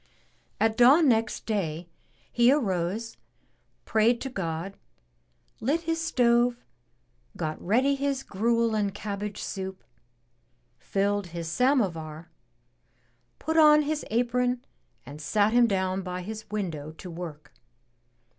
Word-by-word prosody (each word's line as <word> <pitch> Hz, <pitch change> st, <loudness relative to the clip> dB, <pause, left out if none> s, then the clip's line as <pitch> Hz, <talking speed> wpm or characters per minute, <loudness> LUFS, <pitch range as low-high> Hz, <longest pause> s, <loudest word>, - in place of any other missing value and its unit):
At 220 Hz, 0 st, +2 dB
dawn 275 Hz, +6 st, +6 dB
next 225 Hz, -3 st, +1 dB
day, 175 Hz, -6 st, -2 dB, 0.4 s
he 240 Hz, +1 st, +5 dB
arose, 210 Hz, -, -1 dB, 0.7 s
prayed 225 Hz, +2 st, +3 dB
to 270 Hz, -, -4 dB
God, 175 Hz, -1 st, -4 dB, 0.8 s
lit 290 Hz, +8 st, 0 dB
his 325 Hz, 0 st, -2 dB
stove, 240 Hz, -4 st, +2 dB, 0.7 s
got 155 Hz, 0 st, -3 dB
ready 255 Hz, +9 st, +3 dB
his 275 Hz, -1 st, -1 dB
gruel 230 Hz, +3 st, +1 dB
and 205 Hz, -3 st, -1 dB
cabbage 205 Hz, 0 st, -5 dB
soup, 190 Hz, -1 st, -6 dB, 1.0 s
filled 200 Hz, 0 st, -1 dB
his 170 Hz, -1 st, -6 dB
samovar, 170 Hz, -, 0 dB, 1.1 s
put 320 Hz, +1 st, -2 dB
on 300 Hz, -1 st, +7 dB
his 300 Hz, +1 st, -2 dB
apron 245 Hz, +2 st, 0 dB, 0.4 s
and 145 Hz, +3 st, -10 dB
sat 205 Hz, +7 st, +2 dB
him 240 Hz, -1 st, +5 dB
down 190 Hz, -2 st, 0 dB
by 180 Hz, -1 st, -5 dB
his 215 Hz, +3 st, -7 dB
window 165 Hz, -8 st, -4 dB
to 175 Hz, +2 st, -10 dB
work. 165 Hz, -3 st, -8 dB
215 Hz, 115 wpm, -27 LUFS, 180-245 Hz, 1.1 s, on